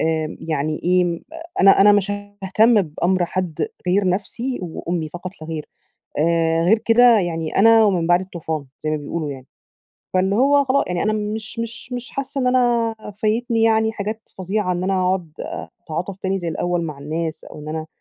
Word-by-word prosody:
آمم، 160 Hz, -1 st, -1 dB
يعني 155 Hz, -1 st, -2 dB
إيه؟ 175 Hz, -1 st, +2 dB, 0.4 s
أنا 195 Hz, 0 st, +7 dB
أنا 205 Hz, +1 st, +8 dB
مش 205 Hz, 0 st, +2 dB, 0.3 s
هاهتم 215 Hz, +3 st, +4 dB
بأمر 175 Hz, +3 st, 0 dB
حد 185 Hz, -, -2 dB, 0.2 s
غير 190 Hz, +1 st, +2 dB
نفسي 230 Hz, +7 st, -2 dB
وأمي 170 Hz, -1 st, -3 dB
فقط 175 Hz, +3 st, -7 dB
لاغير، 155 Hz, -1 st, -6 dB, 0.5 s
آآ، 165 Hz, +1 st, +2 dB
غير 215 Hz, +6 st, +5 dB
كده 230 Hz, +1 st, +5 dB
يعني 165 Hz, -3 st, -3 dB
أنا 225 Hz, +1 st, +7 dB
ومن 180 Hz, -5 st, +2 dB
بعدي 175 Hz, +2 st, +4 dB
الطوفان، 160 Hz, -5 st, -4 dB, 0.2 s
زي 155 Hz, -, 0 dB
ما 155 Hz, -, +1 dB
بيقولوا 150 Hz, +1 st, -4 dB
يعني. 130 Hz, -2 st, -9 dB, 0.7 s
فاللي 190 Hz, +2 st, +2 dB
هو 280 Hz, +3 st, +4 dB
خلا 270 Hz, +1 st, +2 dB
يعني 180 Hz, -1 st, -1 dB
أنا 215 Hz, -, +1 dB
مش 215 Hz, +1 st, -4 dB
مش 230 Hz, +2 st, -6 dB
مش 250 Hz, +2 st, -5 dB
حاسة 275 Hz, 0 st, -4 dB
إن 255 Hz, -, 0 dB
أنا 240 Hz, -3 st, +2 dB, 0.3 s
فايتني 225 Hz, +1 st, +1 dB
يعني 220 Hz, 0 st, +3 dB
حاجات 215 Hz, +1 st, -4 dB, 0.2 s
فظيعة 190 Hz, 0 st, -1 dB
إن 180 Hz, +1 st, -2 dB
أنا 195 Hz, -, +1 dB
أقعد 180 Hz, -3 st, -1 dB, 0.5 s
أتعاطف 175 Hz, +4 st, -4 dB
تاني 195 Hz, 0 st, -1 dB
زي 175 Hz, -2 st, -4 dB
الأول 175 Hz, +1 st, -1 dB
مع 150 Hz, -4 st, -5 dB
الناس، 160 Hz, +3 st, -4 dB
أو -, -, -11 dB
إن 150 Hz, -, -8 dB
أنا 155 Hz, 0 st, -4 dB
185 Hz, 175 wpm, -21 LUFS, 165-220 Hz, 0.7 s, أنا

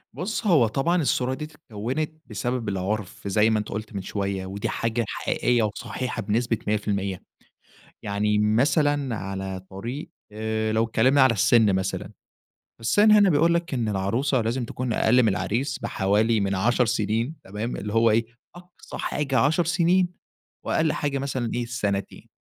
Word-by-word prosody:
بُص، 215 Hz, +4 st, -3 dB
هو 150 Hz, -, +5 dB
طبعًا 165 Hz, +10 st, +1 dB
الصورة 130 Hz, -3 st, 0 dB
دِية 150 Hz, +3 st, -5 dB
اتكوّنت 145 Hz, -1 st, -4 dB, 0.2 s
بسبب 120 Hz, +2 st, -2 dB
العُرف 100 Hz, +1 st, -3 dB
زي 105 Hz, +3 st, +3 dB
ما 110 Hz, -1 st, +2 dB
أنت 105 Hz, -, -5 dB
قُلت 110 Hz, +1 st, -5 dB
من 100 Hz, -, -2 dB
شوية 100 Hz, -1 st, -3 dB
ودي 100 Hz, +2 st, -4 dB
حاجة 115 Hz, 0 st, -1 dB
حقيقية 120 Hz, +3 st, 0 dB
وصحيحة 110 Hz, +3 st, -3 dB
بنسبة 115 Hz, +2 st, 0 dB
100%. 100 Hz, -3 st, -1 dB, 0.8 s
يعني 105 Hz, +1 st, 0 dB
مثلًا 135 Hz, +4 st, +2 dB
على 95 Hz, -1 st, -5 dB
طريق 120 Hz, +10 st, -6 dB, 0.2 s
آآ 110 Hz, 0 st, -2 dB
لو 110 Hz, +1 st, +2 dB
اتكلّمنا 130 Hz, +5 st, +3 dB
على 130 Hz, -2 st, +6 dB
السِن 110 Hz, -1 st, +4 dB
مثلًا، 95 Hz, +1 st, -3 dB, 0.7 s
السِن 205 Hz, -, +4 dB
هنا 205 Hz, -3 st, +6 dB
بيقول 165 Hz, +3 st, +3 dB
لك 170 Hz, -4 st, -1 dB
إن 115 Hz, -3 st, -1 dB
العروسة 115 Hz, +7 st, 0 dB
لازم 120 Hz, +3 st, -1 dB
تكون 125 Hz, +1 st, -3 dB
أقَل 125 Hz, +3 st, +4 dB
من 115 Hz, -, +3 dB
العريس 115 Hz, +7 st, -1 dB
بحوالي 105 Hz, +3 st, +1 dB
من 100 Hz, 0 st, 0 dB
10 120 Hz, +6 st, +2 dB
سنين 115 Hz, +5 st, -1 dB
تمام؟ 105 Hz, +5 st, -4 dB
اللي 105 Hz, +1 st, -5 dB
هو 115 Hz, +1 st, +4 dB
إيه، 115 Hz, +2 st, +2 dB, 0.3 s
أقصى 175 Hz, 0 st, -11 dB
حاجة 135 Hz, -4 st, -1 dB
10 155 Hz, +7 st, +3 dB
سنين 175 Hz, +2 st, +2 dB, 0.6 s
وأقَل 160 Hz, -1 st, +1 dB
حاجة 145 Hz, -2 st, -1 dB
مثلًا 130 Hz, -4 st, -2 dB
إيه، 120 Hz, -, -1 dB
سنتين. 100 Hz, -5 st, -3 dB
115 Hz, 155 wpm, -25 LUFS, 105-135 Hz, 0.8 s, على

